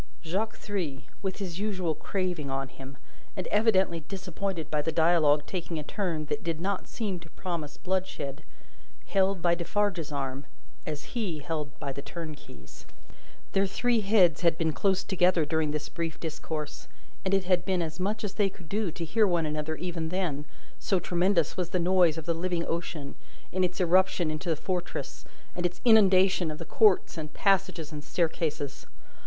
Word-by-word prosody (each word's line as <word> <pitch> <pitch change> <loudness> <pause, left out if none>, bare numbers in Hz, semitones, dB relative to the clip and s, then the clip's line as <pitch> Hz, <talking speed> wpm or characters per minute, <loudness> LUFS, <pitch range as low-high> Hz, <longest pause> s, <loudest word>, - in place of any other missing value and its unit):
Jacques 195 +7 -1
Three, 160 -10 -3 0.2
with 190 -2 -2
his 185 -3 -4
usual 190 -6 0
craving 180 -4 -2
on 135 0 -2
him, 135 0 -11 0.4
and 185 - -2
evidently 195 -5 +3
disappointed 180 -1 -4
by 150 -1 +2
the 160 - -1
dialogue 160 -3 +4
taking 170 -2 -4
a 150 - -3
turn 165 -3 -2
that - - -3
did 165 -2 -2
not 195 +2 -2
seem 200 -6 -3
to 170 -1 -14
promise 160 -4 -5
bloodshed, 180 -6 -2 0.6
held 195 -2 +1
by 170 -1 +4
Defarge's 175 -2 0
arm 135 -1 -3 0.4
as 150 -1 -5
he 210 -10 -1
held 150 -1 -4
by 140 - -3
the 140 - -5
turnkey's. 150 - -9 0.6
Their 195 0 +3
three 235 +4 +2
heads 195 -6 +4
had 170 -2 +3
been 160 -2 +1
close 195 +4 +2
together 180 -4 +3
during 160 0 +1
this 150 0 -2
brief 165 -2 -4
discourse, 155 -1 -5 0.4
and 190 - 0
it 195 -1 +3
had 180 -1 +2
been 185 -2 +1
as 160 +2 -5
much 210 +4 -1
as 200 -2 -2
they 200 0 +2
could 180 -3 -14
do 210 -2 0
to 165 +1 -4
hear 215 +6 +3
one 170 -3 +2
another, 155 +1 -2
even 170 -2 -3
then: 165 -6 -1 0.3
so 190 -3 +1
tremendous 175 -2 +2
was 180 -2 -1
the 180 - 0
noise 175 -2 +4
of 160 - -5
the 170 - +1
living 170 0 -1
ocean, 165 -4 -3 0.4
in 185 0 +1
its 180 +1 -1
irruption 180 -2 +3
into 155 +3 -3
the 160 - +3
Fortress, 180 +2 -4 0.3
and 175 - -2
its 175 0 -1
inundation 190 -5 +6
of 155 - -4
the - - -6
courts 205 -5 +4
and 150 -1 -7
passages 185 -5 +2
and 150 -1 -6
staircases. 155 -4 -1
175 Hz, 175 wpm, -29 LUFS, 155-190 Hz, 0.6 s, inundation